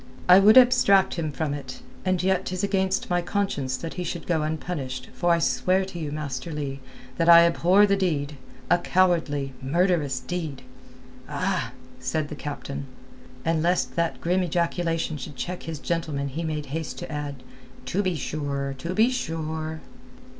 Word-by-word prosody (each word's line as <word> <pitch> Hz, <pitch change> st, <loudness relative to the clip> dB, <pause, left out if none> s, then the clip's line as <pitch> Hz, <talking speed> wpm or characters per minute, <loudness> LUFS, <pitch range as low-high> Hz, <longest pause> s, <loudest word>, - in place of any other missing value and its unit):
"I 180 Hz, +1 st, +9 dB
would 210 Hz, +4 st, +7 dB
abstract 245 Hz, -6 st, +6 dB
him 160 Hz, -3 st, -2 dB
from 145 Hz, 0 st, -2 dB
it, 135 Hz, -3 st, -7 dB, 0.2 s
and 185 Hz, -1 st, 0 dB
yet 190 Hz, -1 st, +1 dB
'tis 185 Hz, +1 st, -3 dB
against 190 Hz, -2 st, 0 dB
my 175 Hz, 0 st, +2 dB
conscience 170 Hz, -9 st, -1 dB
that 165 Hz, -, -6 dB
he 180 Hz, -, -4 dB
should 170 Hz, -1 st, -5 dB
go 165 Hz, -3 st, +1 dB
unpunished 150 Hz, -5 st, -4 dB
for 175 Hz, -, 0 dB
I 170 Hz, -, +5 dB
swear 185 Hz, +3 st, +1 dB
to 175 Hz, -2 st, -8 dB
you, 150 Hz, -3 st, -4 dB
Master 145 Hz, 0 st, -4 dB
Leigh, 140 Hz, -3 st, -4 dB, 0.4 s
that 165 Hz, 0 st, +2 dB
I 170 Hz, 0 st, +10 dB
abhor 180 Hz, +4 st, +4 dB
the 200 Hz, -1 st, +2 dB
deed—a 150 Hz, -2 st, -1 dB
cowardly, 160 Hz, -8 st, +1 dB
murderous 150 Hz, -2 st, +1 dB
deed!" 145 Hz, -1 st, -5 dB, 0.7 s
"Ah!" -, -, -1 dB, 0.3 s
said 145 Hz, +4 st, -2 dB
the -, -, -6 dB
captain. 140 Hz, -1 st, -6 dB, 0.6 s
And 165 Hz, -1 st, +1 dB
lest 175 Hz, +2 st, +1 dB
that 170 Hz, -1 st, 0 dB
grim 180 Hz, +2 st, +1 dB
ejaculation 170 Hz, -2 st, -1 dB
should 135 Hz, +1 st, -8 dB
check 180 Hz, +6 st, -4 dB
his 160 Hz, -, -4 dB
gentleman 150 Hz, -3 st, -2 dB
he 160 Hz, +5 st, -4 dB
made 155 Hz, -2 st, -3 dB
haste 160 Hz, -1 st, -4 dB
to -, -, -7 dB
add—"To 145 Hz, +3 st, -5 dB
be 185 Hz, -3 st, 0 dB
sure! 140 Hz, -2 st, -3 dB
To 170 Hz, +7 st, -4 dB
be 225 Hz, +4 st, +4 dB
sure!" 160 Hz, -7 st, -3 dB
165 Hz, 160 wpm, -25 LUFS, 145-180 Hz, 0.7 s, I